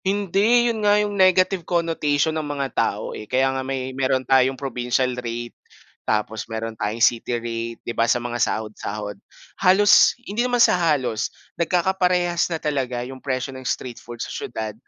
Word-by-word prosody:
Hindi, 205 +5 +2
yun 220 - -5
nga 205 0 +4
yung 210 0 0
negative 185 -1 +3
connotation 160 -3 0
ng 155 - -1
mga 140 -2 -2
tao, - - -1
eh, 105 - -9
kaya 135 +1 +2
nga 135 - -2
may 130 0 -4
meron 130 0 0
tayong 130 0 +3
provincial 125 -1 -1
rate, 120 0 -5 0.5
tapos 110 +1 -2
meron 115 0 -4
tayong 110 +1 +1
city 120 0 0
rate, 115 0 -5
'di 120 - -3
ba 115 0 +1
sa 120 - +4
mga 120 0 -4
sahod-sahod. 105 -2 -3 0.4
Halos 200 +6 +6
hindi 210 +4 -2
naman 245 0 +1
sa 235 - +6
halos 140 -9 0 0.2
nagkakaparehas 180 0 +1
na 165 - -1
talaga 130 -6 -2
yung 130 0 -9
presyo 130 0 -3
ng 130 - -8
street 125 -1 -4
food 120 0 -10
sa - - -8
siyudad 110 -2 -5
130 Hz, 170 wpm, -22 LUFS, 120-175 Hz, 0.5 s, Halos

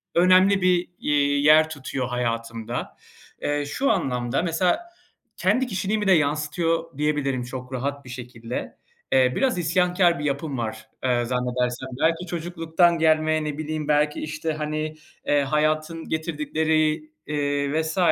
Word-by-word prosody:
önemli 185 +3 +5
bir, 180 -1 +2
iii, 145 -1 +2
yer 155 +1 +6
tutuyor 135 -4 -4
hayatımda. 115 -2 -3 0.4
Eee, 145 0 0
şu 270 - +1
anlamda, 125 - 0
mesela, 175 - +1 0.6
kendi 260 0 +2
kişiliğimi 210 0 -1
de - - +5
yansıtıyor 160 +1 +1
diyebilirim 145 -4 0
çok 125 +1 -7
rahat 140 +2 -3
bir - - -11
şekilde. 120 -1 -6 0.3
Eee, 130 -1 +4
biraz 260 -7 +1
isyankâr 175 0 +2
bir - - -4
yapım 140 0 -2
var, 110 -1 -5
eee, 120 -2 +1
zannedersem. 125 +1 -1
Belki 165 +2 +2
çocukluktan 170 0 +1
gelme, 155 0 +3
ne 150 -1 -4
bileyim, 155 -1 -3
belki, 150 0 +2
işte, 155 +1 -3
hani, 155 0 -3 0.3
eee, 145 0 +3
hayatın 155 +3 0
getirdikleri, 155 0 0 0.2
eee, 145 0 0
vs. 160 +2 -4
155 Hz, 135 wpm, -24 LUFS, 135-165 Hz, 0.6 s, yer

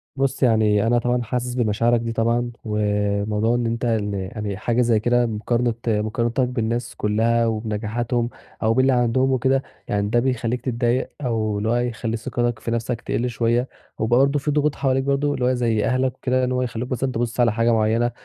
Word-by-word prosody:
بُصّ، 135 0 0
يعني 110 -3 +3
أنا 120 +1 +3
طبعًا 120 +1 0
حاسس 125 +1 -3
بمشاعرك 115 0 +2
دي 115 0 -3
طبعًا 115 +2 0
وموضوع 105 +1 0
إن 120 -1 0
أنت 115 +1 -2
إن 110 -3 0
يعني 100 +1 -4
حاجة 120 +3 0
زي 115 -3 +3
كده 120 +2 +2
مقارنة 115 +2 0
مقارنتك 115 +4 0
بالناس 120 -1 -2
كلّها 115 +3 +1
وبنجاحاتهم 115 +2 -1 0.3
أو 110 +1 +3
باللي 130 +2 +3
عندهم 125 +2 +2
وكده، 130 +1 +2 0.2
يعني 100 0 0
ده 120 +2 +3
بيخلّيك 125 -1 -1
تتضايق 120 0 0
أو 110 -5 -1
إن 105 - -3
هو 115 +2 +2
يخلّي 120 -1 -2
ثقتك 120 0 -2
في 115 - -4
نَفسك 115 +1 -2
تقِلّ 125 +1 -1
شوية، 120 +2 0 0.3
وبرضه 135 +6 +3
في 150 +2 -1
ضغوط 150 0 +1
حواليك 135 -1 +1
برضه 140 -2 +1
زي 115 -4 +1
أهلك 130 0 +1
وكده 130 0 0
إن 125 - 0
هو 125 0 0
يخلّوك 125 0 -4
مثلًا 130 +1 -1
تبُصّ 120 +1 -3
على 120 -3 +4
حاجة 115 +1 +2
معيّنة، 115 +2 +2
120 Hz, 180 wpm, -22 LUFS, 110-125 Hz, 0.3 s, على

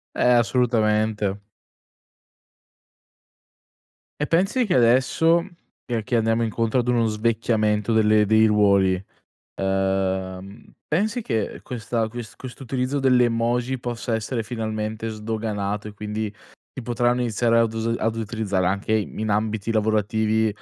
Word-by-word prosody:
Eh, 125 - +4
assolutamente. 110 -4 +1 2.8
E 150 - -1
pensi 195 +9 +2
che - - +1
adesso, 130 +8 +3 0.4
che 115 -3 -2
che 120 - -2
andiamo 115 +1 +1
incontro 115 +2 0
ad 120 - -1
uno 120 -2 +2
svecchiamento 110 -1 0
delle 110 -1 +4
dei 110 +1 +5
ruoli, 100 -3 +3 0.5
ehm, 95 0 -2 0.2
pensi 215 +9 0
che, 110 - -2
ehm, - - -11
questa 115 -1 -3
ques 120 -1 -8
questo 130 +1 -9
utilizzo 130 +2 -1
dell'emoji 125 -1 +2
possa 120 -1 -3
essere 115 +2 -2
finalmente 110 -1 -4
sdoganato, 105 -1 -3
e 105 - -12
quindi 105 0 -4 0.4
si 130 - -6
potranno 120 +1 0
iniziare 115 0 +2
ad 115 -1 +1
us 115 +1 -1
ad 115 0 -1
utilizzare 105 -4 -1
anche 100 +3 -1
in 110 0 -2
ambiti 105 +1 -1
lavorativi, 110 0 +1
110 Hz, 120 wpm, -23 LUFS, 105-120 Hz, 2.8 s, dei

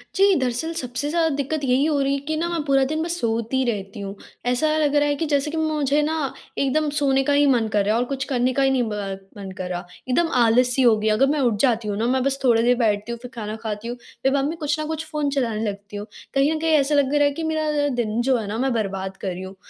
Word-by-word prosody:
जी, 395 +1 +5
दरअसल 260 +6 -1
सबसे 265 -1 -3
ज़्यादा 325 0 +2
दिक्कत 285 +1 -2
यही 265 +2 +2
हो 300 -3 +1
रही 275 0 +1
है 280 - 0
कि 315 - 0
ना 335 - -1
मैं 340 -2 -1
पूरा 275 -1 +3
दिन 310 0 -1
बस 345 +1 -3
सोती 230 +3 0
रहती 205 -3 -3
हूँ। 200 0 -6 0.3
ऐसा 250 +5 +1
लग 295 -1 +1
रहा 290 0 +4
है 290 - +1
कि 325 - -2
जैसे 290 0 0
कि 325 - -3
मुझे 300 -2 +1
ना, 305 -2 -1 0.2
एकदम 295 +3 +1
सोने 275 -2 +2
का 285 - +1
ही 285 0 +4
मन 240 -5 +3
कर 210 -2 +1
रहा 215 +2 +2
है - - +2
और - - 0
कुछ 270 -1 -2
करने 255 -1 0
का 275 - +1
ही 270 - +4
नहीं 255 -2 +2
ब 200 -2 -4 0.2
मन 195 -1 -7
कर 185 -1 -4
रहा, 175 0 -4 0.2
एकदम 330 +6 +2
आलस-सी 245 +2 +3
हो 235 -3 +6
गई, 215 +1 -2
अगर 255 +6 +3
मैं 300 - +1
उठ 240 -6 +2
जाती 235 -4 +2
हूँ 205 - -2
ना, 225 - 0
मैं 260 0 +1
बस 275 0 0
थोड़ी 235 -3 +4
देर 245 +1 +4
बैठती 215 -1 0
हूँ 235 - -5
फिर 250 0 -9
खाना 215 -1 -4
खाती 215 +1 -4
हूँ 245 - -5 0.3
फिर 270 - +3
मम्मी 290 +4 -1
कुछ 300 -2 -1
ना 305 - -2
कुछ 320 0 -4
फ़ोन 300 -2 0
चलाने 230 -6 -1
लगती 205 +1 -8
हूँ, 205 - -5 0.3
कहीं 275 +3 +3
न 315 - -2
कहीं 320 0 +1
ऐसा 285 +1 +2
लग 280 0 +2
रहा 290 0 +4
है 285 - +3
कि 325 +3 -5
मेरा 305 -2 0
दिन 230 -1 0
जो 260 0 +2
है 215 - -4
ना 210 +2 -3
मैं 265 +1 0
बर्बाद 195 -3 -3
कर 195 - -6
रही 185 0 -4
हूँ। 190 +1 -9
265 Hz, 280 wpm, -23 LUFS, 225-295 Hz, 0.3 s, हो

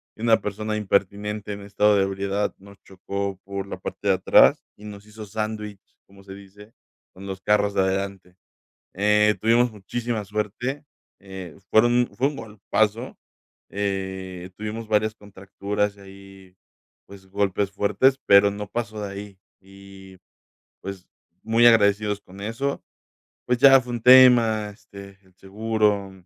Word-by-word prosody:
y - - -14
una 115 -1 +3
persona 105 +1 -4
impertinente 105 0 -2
en 100 - -8
estado 105 +1 +2
de 100 - +3
ebriedad 100 +1 -2
nos 100 0 -17
chocó 100 +1 -5
por 100 0 -6
la 100 - -7
parte 100 +2 -7
de 95 - +4
atrás 95 - +4
y 105 - -15
nos 105 -1 -10
hizo 105 0 -11
sándwich, 105 -1 -5 0.3
como 100 0 -18
se 95 0 -11
dice, 100 +2 -15 0.4
con 95 +2 -11
los 95 -1 -7
carros 105 0 +1
de - - +3
adelante. 95 -1 -3 0.6
Eh, 105 +2 +3
tuvimos 120 +2 +2
muchísima 115 +2 -4
suerte, 110 +8 -4 0.3
eh, 95 -4 -10
fueron 120 +2 +3
fue 130 +2 +1
un 150 - -9
golpazo, 110 +2 -2 0.5
eh, 95 -2 -4
tuvimos 110 +1 -6
varias 110 0 +1
contracturas 100 0 -4
y - - -18
ahí, 95 -1 -15 0.5
pues, 95 -1 -15
golpes 100 0 -1
fuertes, 130 +7 +2
pero 100 0 +6
no 105 +1 -7
pasó 110 0 -5
de 100 -1 -5
ahí, 100 -1 -10 0.2
y, 95 0 -15 0.6
pues, 95 -2 -8 0.4
muy 115 +2 +3
agradecidos 105 -2 +3
con 95 0 -15
eso. 115 +7 -3 0.6
Pues, 125 0 +1
ya 135 0 +7
fue 125 -1 -8
un 120 - -5
tema, 120 -4 +6
este, 100 -1 -14
el 95 -1 -27
seguro, 105 0 -1
100 Hz, 145 wpm, -23 LUFS, 95-110 Hz, 0.6 s, ya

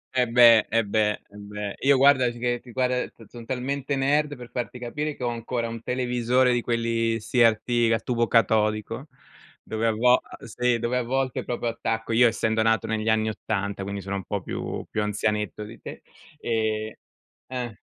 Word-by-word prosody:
Eh 125 -1 +3
beh, 115 -2 +6
eh 115 0 +2
beh, 105 +1 +2 0.2
eh 100 - -20
beh. 105 0 -6
Io 140 0 +4
guardati 130 -3 +4
che 120 0 -1
che 125 - -13
guarda 125 0 0
son 115 - -15
son 120 -1 -11
talmente 135 +2 -2
nerd, 145 +2 +1
per 125 -1 -11
farti 125 0 -4
capire, 150 +5 -4
che 125 - -8
ho 120 - +1
ancora 115 0 -3
un 115 0 -6
televisore 125 0 +1
di 120 - +1
quelli 115 -1 0
CRT 120 +1 +2
a 115 - +1
tubo 120 0 0
catodico, 110 +3 +1 0.6
dove 110 +1 -2
a - - +3
vol 125 +3 +4
a - - -13
ehm, - - -12
sì, 125 +1 0
dove 120 +2 -1
a 125 - 0
volte 130 +1 -1
proprio 120 -1 -2
attacco 115 0 -3
io 120 +2 +6
essendo 110 -1 0
nato 115 -2 +2
negli 110 0 -1
anni 110 0 +2
'80, 100 -2 -3
quindi 100 +1 -4
sono 100 +1 -4
un 95 - -6
po' 100 -2 -3
più - - -5
più 110 - -2
anzianetto 105 0 -1
di 105 - -11
te, - - -9 0.4
ehm 110 -1 -2 0.5
ah 125 -3 -4
115 Hz, 190 wpm, -25 LUFS, 110-125 Hz, 0.6 s, beh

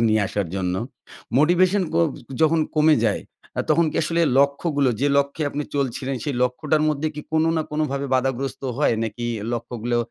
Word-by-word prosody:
নিয়ে 110 0 +3
আসার 100 -2 -2
জন্য। 90 -1 -1 0.6
মোটিভেশন 180 +6 +4
ক - - -5 0.5
যখন 160 +1 +4 0.2
কমে 155 +1 +5
যায় 105 - +1 0.4
আ - - +3
তখন 170 - +4
কি - - -5
আসলে 165 +2 0 0.2
লক্ষ্যগুলো 140 0 +2
যে 140 - +2
লক্ষ্যে 140 +3 -1
আপনি 145 +1 -3
চলছিলেন 135 -1 -1
সেই 145 -3 -2
লক্ষ্যটার 150 +5 +1
মধ্যে 155 +1 0
কি 150 - -5
কোনো 160 +1 +3
না 160 - +1
কোনোভাবে 140 -2 -1
বাধাগ্রস্ত 135 +1 -1 0.2
হয়? 150 - +3
নাকি 115 +2 -4 0.3
লক্ষ্যগুলো 120 0 -2
140 Hz, 165 wpm, -23 LUFS, 125-155 Hz, 0.6 s, কমে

